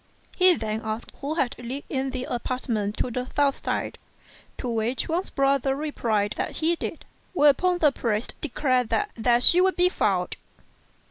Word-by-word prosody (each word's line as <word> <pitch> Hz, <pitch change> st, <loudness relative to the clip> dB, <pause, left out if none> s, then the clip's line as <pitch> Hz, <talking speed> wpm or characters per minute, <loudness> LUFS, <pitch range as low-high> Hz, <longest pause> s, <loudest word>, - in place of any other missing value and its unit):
He 365 Hz, -1 st, +6 dB
then 220 Hz, -3 st, -3 dB
asked 220 Hz, +1 st, -4 dB
who 290 Hz, +3 st, -2 dB
lived 255 Hz, -2 st, -3 dB
in 265 Hz, 0 st, -2 dB
the 255 Hz, -1 st, -4 dB
apartments 235 Hz, -4 st, -2 dB
on 245 Hz, -, -5 dB
the 250 Hz, +1 st, -3 dB
south 285 Hz, -1 st, +1 dB
side, -, -, -2 dB, 0.6 s
to -, -, -4 dB
which 230 Hz, +2 st, -1 dB
Wang's 345 Hz, +4 st, -1 dB
brother 275 Hz, -1 st, +1 dB
replied 230 Hz, -8 st, -1 dB
that -, -, -2 dB
he 330 Hz, +2 st, +1 dB
did; -, -, -6 dB, 0.3 s
whereupon 350 Hz, +3 st, +4 dB
the 305 Hz, -4 st, +4 dB
priest 225 Hz, -4 st, -2 dB
declared 255 Hz, -4 st, 0 dB
that 415 Hz, 0 st, 0 dB
there 235 Hz, +1 st, +3 dB
she 345 Hz, +8 st, +6 dB
would 375 Hz, 0 st, +3 dB
be 360 Hz, 0 st, +4 dB
found. 185 Hz, -, 0 dB
260 Hz, 160 wpm, -25 LUFS, 230-305 Hz, 0.6 s, He